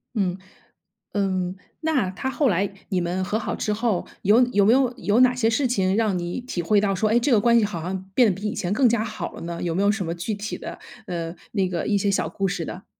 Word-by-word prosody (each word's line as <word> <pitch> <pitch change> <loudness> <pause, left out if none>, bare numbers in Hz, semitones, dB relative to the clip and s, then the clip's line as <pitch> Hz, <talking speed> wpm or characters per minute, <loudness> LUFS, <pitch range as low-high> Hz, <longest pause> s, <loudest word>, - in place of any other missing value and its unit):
嗯 190 -3 0 0.8
嗯。 185 -2 -1 0.3
那 290 -12 +1
她 265 +7 -3
后 270 -1 +1
来 195 +2 +1 0.2
你 185 - +1
们 180 +2 -1
和 210 +3 -1
好 220 -2 -3
之 210 - -2
后， 220 -4 -1 0.2
有 215 +5 +5
有 205 -5 +3
没 225 - +6
有 260 -2 +3
有 205 +6 +2
哪 250 -1 +5
些 225 -2 +2
事 255 +3 +1
情 190 -5 +1
让 215 -4 +1
你 175 +5 -3
体 245 -8 -4
会 205 +4 +3
到 195 -2 +1
说， 215 +3 +1
哎， 235 - +4
这 260 +3 0
个 225 - +6
关 235 +2 +4
系 215 - +2
好 185 -6 -4
像 185 +2 -4
变 245 0 +6
得 200 - +2
比 210 - -3
以 210 - -2
前 175 - -2
更 260 +1 +4
加 225 -1 +1
好 215 -1 -5
了 - - -9
呢？ 170 0 -5
有 170 -2 -1
没 190 - +1
有 205 - +4
什 205 -4 -2
么 165 - -2
具 175 +6 -3
体 205 +1 -4
的 - - -8 0.3
呃， 170 -1 -4 0.2
那 195 -3 +1
个 175 -2 -2
一 205 -1 +2
些 200 +1 +1
小 195 - +1
故 195 -1 -2
事 170 -2 -3
的？ 185 - -8
205 Hz, 280 characters per minute, -24 LUFS, 185-225 Hz, 0.8 s, 没